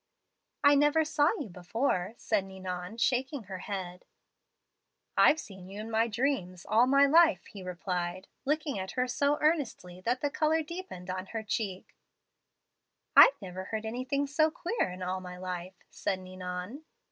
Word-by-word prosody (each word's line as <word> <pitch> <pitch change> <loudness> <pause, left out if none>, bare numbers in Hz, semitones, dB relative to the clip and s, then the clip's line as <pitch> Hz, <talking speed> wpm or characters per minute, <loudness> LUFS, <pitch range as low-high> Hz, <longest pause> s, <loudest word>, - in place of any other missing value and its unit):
"'I 285 0 +7
never 295 +2 +4
saw 295 -1 +3
you 280 - -4
before,' 185 +3 -1
said 215 -3 0
Ninon, 190 +1 -6
shaking 260 +2 0
her 190 -2 -7
head. 185 -2 -5 1.1
"'I've 315 - +6
seen 190 -7 -10
you 200 +2 -8
in 220 +1 -6
my 225 +1 +3
dreams 210 -7 -1
all 230 +3 +4
my 275 +1 +6
life,' 325 +2 +5
he 200 - -10
replied, 180 0 -3 0.2
looking 295 -5 -1
at 190 0 -5
her 250 0 0
so 280 +4 +1
earnestly 270 - 0
that 245 +6 0
the 290 - 0
color 315 +2 +2
deepened 305 - -7
on 185 +1 -4
her 225 +1 -4
cheek. 200 -3 -3 1.2
"'I - - +11
never 185 0 -6
heard 220 +2 -4
anything 255 +5 -1
so 310 +3 +3
queer 345 - -2
in 185 +1 -7
all 185 +1 -2
my 180 -1 -8
life,' 180 0 -6
said 195 - -1
Ninon. 185 +7 -6
215 Hz, 160 wpm, -30 LUFS, 185-280 Hz, 1.2 s, I